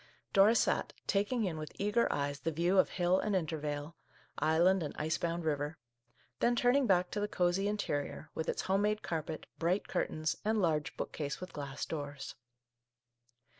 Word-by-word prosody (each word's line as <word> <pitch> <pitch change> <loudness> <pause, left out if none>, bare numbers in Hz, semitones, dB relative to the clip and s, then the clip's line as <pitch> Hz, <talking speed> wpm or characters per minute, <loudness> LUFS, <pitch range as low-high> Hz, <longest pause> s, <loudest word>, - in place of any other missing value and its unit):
Dora 205 +3 +6
sat, - - +1
taking 210 +4 +1
in 165 -4 -2
with 155 -1 -7
eager 210 +4 +2
eyes 145 0 -1
the 165 - -1
view 175 +5 +2
of - - +4
hill 180 0 +2
and 210 -2 0
intervale, 155 -3 -2 0.4
island 175 +4 +4
and 150 - -4
ice 155 +1 -1
bound 170 0 -2
river; 150 0 -1 0.6
then 240 0 +3
turning 245 +2 +3
back 180 -2 +3
to 210 - -2
the 205 - 0
cosey 180 +1 +1
interior, 155 -8 -2
with 160 - -3
its - - -1
home 195 +1 +2
made 210 +1 +1
carpet, 160 -1 -3
bright 175 +4 +1
curtains, 155 0 -1
and 220 +1 +1
large 155 -5 0
bookcase 145 -3 -3
with 185 - -8
glass 140 -2 -4
doors. 145 -3 -5
170 Hz, 170 wpm, -33 LUFS, 155-200 Hz, 0.6 s, Dora